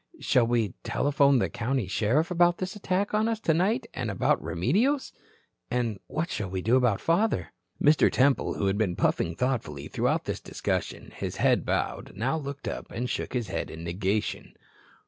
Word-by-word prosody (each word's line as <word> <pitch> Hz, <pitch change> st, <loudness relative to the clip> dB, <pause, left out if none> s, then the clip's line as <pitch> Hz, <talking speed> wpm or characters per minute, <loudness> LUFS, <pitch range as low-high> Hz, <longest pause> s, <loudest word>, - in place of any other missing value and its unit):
Shall 120 Hz, -3 st, +3 dB
we, 115 Hz, -5 st, +1 dB
telephone 140 Hz, -1 st, +3 dB
the -, -, +2 dB
county 125 Hz, 0 st, -1 dB
sheriff 115 Hz, -, +1 dB
about 175 Hz, 0 st, +4 dB
this 185 Hz, +3 st, -4 dB
attack 200 Hz, 0 st, -1 dB
on 215 Hz, +1 st, +2 dB
us 225 Hz, -1 st, -1 dB
tonight 205 Hz, -, +1 dB
and 120 Hz, -4 st, -3 dB
about 100 Hz, -, +1 dB
Remedios? 165 Hz, -, +1 dB, 0.6 s
And 120 Hz, -5 st, -1 dB
what 165 Hz, +4 st, -3 dB
shall 105 Hz, -3 st, -3 dB
we 95 Hz, -1 st, -3 dB
do 115 Hz, +4 st, +3 dB
about 125 Hz, -6 st, +3 dB
father?" 205 Hz, +7 st, +1 dB, 0.3 s
Mr. 150 Hz, +1 st, +5 dB
Temple 135 Hz, +1 st, +2 dB
who -, -, -1 dB
had 95 Hz, +2 st, +1 dB
been 95 Hz, -5 st, +1 dB
puffing 85 Hz, -1 st, 0 dB
thoughtfully 95 Hz, -, -2 dB
throughout -, -, 0 dB
this -, -, -3 dB
discussion, -, -, -3 dB
his -, -, -4 dB
head -, -, +2 dB
bowed, -, -, -2 dB
now 125 Hz, +9 st, 0 dB
looked 140 Hz, -2 st, -5 dB
up, -, -, -5 dB
and 125 Hz, +2 st, -3 dB
shook -, -, -3 dB
his 120 Hz, -5 st, -2 dB
head -, -, -3 dB
in 80 Hz, +1 st, -8 dB
negation. 95 Hz, +5 st, -2 dB
125 Hz, 175 wpm, -27 LUFS, 105-170 Hz, 0.6 s, Mr